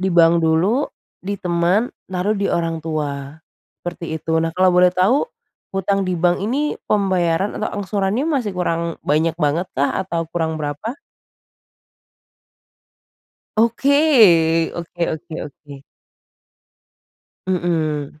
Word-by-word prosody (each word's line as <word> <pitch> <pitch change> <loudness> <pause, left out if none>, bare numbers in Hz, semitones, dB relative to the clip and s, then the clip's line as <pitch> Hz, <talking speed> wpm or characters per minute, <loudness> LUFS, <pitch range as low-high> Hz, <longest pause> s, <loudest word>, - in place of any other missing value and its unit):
Di 190 - +1
bank 170 -1 +5
dulu, 170 - +2 0.3
ditemen 185 +2 0 0.2
lalu 200 +2 0
diorang 165 -1 -1
tua, 145 -2 -4 0.4
seperti 170 -2 -5
itu 160 - -4
nah 165 - 0
kalau 185 0 +5
boleh 180 0 +6
tahu, 185 +10 +3 0.5
utang 195 +1 +1
di 180 - 0
bank 175 +1 +2
ini 275 +8 0 0.2
pembayaran 190 -2 +1
atau 215 - -1
angsurannya 200 +6 -1
masih 270 -10 0
kurang 170 -1 -1
banyak 160 +2 +2
banget 160 +3 +1
kah? 140 +2 +1
Atau 170 -3 -2
kurang 160 -2 -1
berapa? 155 - -4 2.6
Oke 235 +6 +3 0.8
oke 170 0 -6
oke 160 +1 -10
oke. 140 -1 -12 1.6
Mhm. 155 -5 -1
175 Hz, 110 wpm, -20 LUFS, 160-195 Hz, 2.6 s, boleh